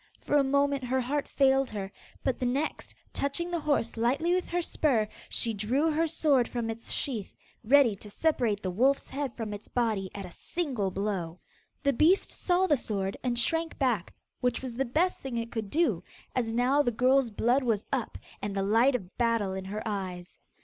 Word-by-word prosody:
For -, -, -1 dB
a 285 Hz, -, +6 dB
moment 280 Hz, 0 st, +2 dB
her 260 Hz, +1 st, +1 dB
heart 275 Hz, +3 st, -1 dB
failed 270 Hz, -1 st, +3 dB
her, 200 Hz, -2 st, -5 dB, 0.3 s
but 260 Hz, -, 0 dB
the 255 Hz, -, -1 dB
next, 280 Hz, +5 st, -2 dB, 0.2 s
touching 340 Hz, +5 st, -1 dB
the 345 Hz, -, 0 dB
horse 285 Hz, -6 st, 0 dB
lightly 270 Hz, +10 st, +1 dB
with 365 Hz, 0 st, 0 dB
her 350 Hz, -, -1 dB
spur, 250 Hz, -10 st, +1 dB, 0.2 s
she 230 Hz, -, +1 dB
drew 250 Hz, +10 st, +1 dB
her 325 Hz, +2 st, +1 dB
sword 295 Hz, -6 st, +2 dB
from 235 Hz, -2 st, -2 dB
its 225 Hz, +1 st, -8 dB
sheath, 230 Hz, -8 st, -3 dB, 0.3 s
ready 250 Hz, -2 st, +5 dB
to 210 Hz, -, -11 dB
separate 230 Hz, -6 st, 0 dB
the 185 Hz, -, -1 dB
wolf's 260 Hz, +9 st, +2 dB
head 275 Hz, -3 st, -3 dB
from 220 Hz, -3 st, -4 dB
its 205 Hz, -, -8 dB
body 220 Hz, -6 st, 0 dB
at 200 Hz, -1 st, -5 dB
a 180 Hz, -, -10 dB
single 260 Hz, -, -2 dB
blow. 185 Hz, -3 st, -3 dB, 0.4 s
The 280 Hz, -1 st, +3 dB
beast 335 Hz, +10 st, +3 dB
saw 360 Hz, +1 st, +1 dB
the 295 Hz, -6 st, +3 dB
sword, 195 Hz, -4 st, -2 dB
and 245 Hz, -2 st, -1 dB
shrank 325 Hz, +7 st, 0 dB
back, 240 Hz, -9 st, 0 dB, 0.2 s
which 250 Hz, 0 st, 0 dB
was 250 Hz, -3 st, -5 dB
the 270 Hz, +2 st, 0 dB
best 320 Hz, +9 st, +1 dB
thing 260 Hz, -3 st, -4 dB
it 230 Hz, 0 st, -3 dB
could 220 Hz, -3 st, -4 dB
do, 335 Hz, +7 st, +1 dB, 0.3 s
as 235 Hz, -3 st, 0 dB
now 250 Hz, +5 st, +3 dB
the 285 Hz, -, +1 dB
girl's 255 Hz, +2 st, +3 dB
blood 240 Hz, +5 st, +2 dB
was 225 Hz, -5 st, 0 dB
up, 260 Hz, -4 st, -2 dB, 0.2 s
and 205 Hz, -1 st, -3 dB
the 195 Hz, -, 0 dB
light 230 Hz, +7 st, +4 dB
of 190 Hz, -6 st, -5 dB
battle 230 Hz, -5 st, +1 dB
in 190 Hz, 0 st, -5 dB
her 210 Hz, +3 st, -4 dB
eyes. 185 Hz, -4 st, -5 dB
245 Hz, 200 wpm, -29 LUFS, 210-280 Hz, 0.4 s, a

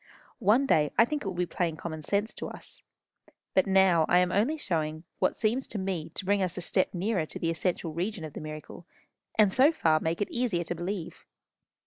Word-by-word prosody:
One 225 Hz, +8 st, +4 dB
day 150 Hz, -, +3 dB
I 230 Hz, -, +7 dB
think 295 Hz, +3 st, -3 dB
it -, -, -5 dB
will 190 Hz, -, -3 dB
be 180 Hz, 0 st, 0 dB
plain 170 Hz, -2 st, -2 dB
common 160 Hz, 0 st, -5 dB
sense 205 Hz, +7 st, -1 dB
to -, -, -6 dB
us. -, -, -9 dB, 0.7 s
But 190 Hz, -, +3 dB
now 190 Hz, -4 st, +4 dB
I 175 Hz, -, +5 dB
am 180 Hz, 0 st, +3 dB
only 235 Hz, +12 st, +1 dB
showing 160 Hz, -, -1 dB
you 160 Hz, -, -12 dB, 0.2 s
what -, -, +1 dB
seems 235 Hz, +5 st, 0 dB
to -, -, -5 dB
me 190 Hz, -5 st, -3 dB
to 190 Hz, -, -4 dB
bring 200 Hz, +1 st, +2 dB
us 185 Hz, 0 st, -1 dB
a -, -, -3 dB
step 185 Hz, +2 st, 0 dB
nearer 180 Hz, -3 st, 0 dB
to -, -, -8 dB
the 165 Hz, -, 0 dB
essential 165 Hz, -1 st, -2 dB
region 180 Hz, +2 st, -3 dB
of 155 Hz, -, -9 dB
the -, -, -7 dB
miracle, 155 Hz, +3 st, -8 dB, 0.5 s
and 210 Hz, -3 st, +5 dB
so 275 Hz, +5 st, +6 dB
far 160 Hz, -, +2 dB
make 165 Hz, +1 st, -1 dB
it 205 Hz, -, -2 dB
easier 230 Hz, -8 st, 0 dB
to 170 Hz, -, -3 dB
believe. 175 Hz, +1 st, -5 dB
180 Hz, 225 wpm, -28 LUFS, 165-205 Hz, 0.7 s, I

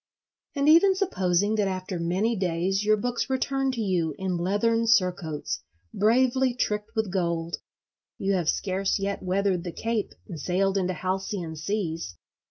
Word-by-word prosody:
And 280 Hz, 0 st, +1 dB
even 340 Hz, +5 st, +6 dB
supposing 205 Hz, -, +1 dB
that 205 Hz, -2 st, +2 dB
after 185 Hz, -1 st, -3 dB
many 190 Hz, +7 st, +1 dB
days 185 Hz, +1 st, 0 dB
your 215 Hz, 0 st, +4 dB
books 245 Hz, +4 st, -2 dB
return 270 Hz, 0 st, 0 dB
to 235 Hz, -, -2 dB
you 175 Hz, -7 st, 0 dB
in 190 Hz, -1 st, -2 dB
leathern 205 Hz, +6 st, +1 dB
surcoats 180 Hz, -7 st, +1 dB, 0.3 s
bravely 250 Hz, +4 st, +3 dB
tricked 210 Hz, -1 st, -2 dB
with 220 Hz, -4 st, -1 dB
gold, 170 Hz, -2 st, -1 dB, 0.6 s
you 195 Hz, +1 st, 0 dB
have 175 Hz, -4 st, +1 dB
scarce 190 Hz, 0 st, 0 dB
yet 200 Hz, 0 st, -2 dB
weathered 185 Hz, -1 st, 0 dB
the 175 Hz, -, -4 dB
Cape 225 Hz, +2 st, -2 dB
and 170 Hz, -6 st, -7 dB
sailed 190 Hz, +5 st, +1 dB
into 185 Hz, -1 st, 0 dB
halcyon 185 Hz, -1 st, -3 dB
seas. 165 Hz, -, -3 dB
195 Hz, 150 wpm, -26 LUFS, 180-225 Hz, 0.6 s, even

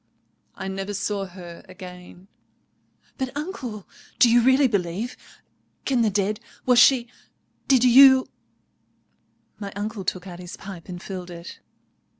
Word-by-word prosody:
"I 190 Hz, -, -6 dB
never 195 Hz, +1 st, -4 dB
saw 200 Hz, 0 st, -2 dB
her 175 Hz, -2 st, -11 dB
again——" 180 Hz, 0 st, -12 dB, 0.9 s
"But, 260 Hz, -1 st, -1 dB
uncle, 260 Hz, -, -6 dB, 0.3 s
do 240 Hz, -, +6 dB
you 240 Hz, +1 st, +6 dB
really 260 Hz, +3 st, +4 dB
believe?—Can 220 Hz, +5 st, -4 dB
the 220 Hz, -, +3 dB
dead?—was 210 Hz, +5 st, 0 dB
she—did 245 Hz, +1 st, +1 dB
you——" 260 Hz, +1 st, +7 dB, 1.3 s
My 200 Hz, -2 st, -6 dB
uncle 205 Hz, 0 st, -4 dB
took 185 Hz, 0 st, -3 dB
out 175 Hz, -2 st, -9 dB
his 180 Hz, -1 st, -9 dB
pipe 190 Hz, -3 st, -10 dB
and 175 Hz, -1 st, -6 dB
filled 185 Hz, -1 st, -7 dB
it. 170 Hz, 0 st, -10 dB
205 Hz, 120 wpm, -24 LUFS, 185-245 Hz, 1.3 s, you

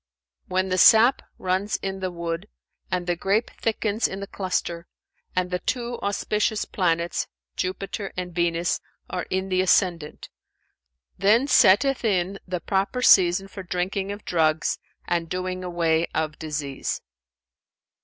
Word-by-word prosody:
"When 185 Hz, 0 st, 0 dB
the 185 Hz, 0 st, +1 dB
sap 230 Hz, +7 st, +7 dB, 0.2 s
runs 190 Hz, +3 st, 0 dB
in 195 Hz, 0 st, -4 dB
the 185 Hz, -1 st, -2 dB
wood 170 Hz, -1 st, -4 dB, 0.4 s
and 180 Hz, -1 st, -1 dB
the 175 Hz, 0 st, 0 dB
grape 200 Hz, +6 st, 0 dB
thickens 220 Hz, -1 st, 0 dB
in 190 Hz, -, -6 dB
the 200 Hz, -, -4 dB
cluster 180 Hz, -3 st, -3 dB, 0.5 s
and 180 Hz, 0 st, 0 dB
the 180 Hz, -, 0 dB
two 240 Hz, +2 st, -3 dB
auspicious 210 Hz, +1 st, 0 dB
planets, 170 Hz, -2 st, 0 dB, 0.3 s
Jupiter 195 Hz, +2 st, -3 dB
and 180 Hz, -1 st, -4 dB
Venus, 170 Hz, 0 st, 0 dB, 0.3 s
are 180 Hz, -, -3 dB
in 190 Hz, +1 st, -1 dB
the 185 Hz, 0 st, +2 dB
ascendant; 175 Hz, -4 st, +1 dB, 0.9 s
then 215 Hz, +7 st, +4 dB
setteth 265 Hz, 0 st, +4 dB
in 195 Hz, -2 st, 0 dB
the 180 Hz, -1 st, -2 dB
proper 195 Hz, +8 st, -1 dB
season 185 Hz, -1 st, +5 dB
for 195 Hz, 0 st, -8 dB
drinking 190 Hz, +2 st, -2 dB
of 205 Hz, +1 st, -8 dB
drugs 160 Hz, -2 st, +1 dB, 0.3 s
and 170 Hz, -1 st, -1 dB
doing 185 Hz, +1 st, -3 dB
away 170 Hz, -2 st, +1 dB
of 155 Hz, -1 st, -2 dB
disease." 150 Hz, -3 st, -3 dB
185 Hz, 135 wpm, -24 LUFS, 175-200 Hz, 0.9 s, sap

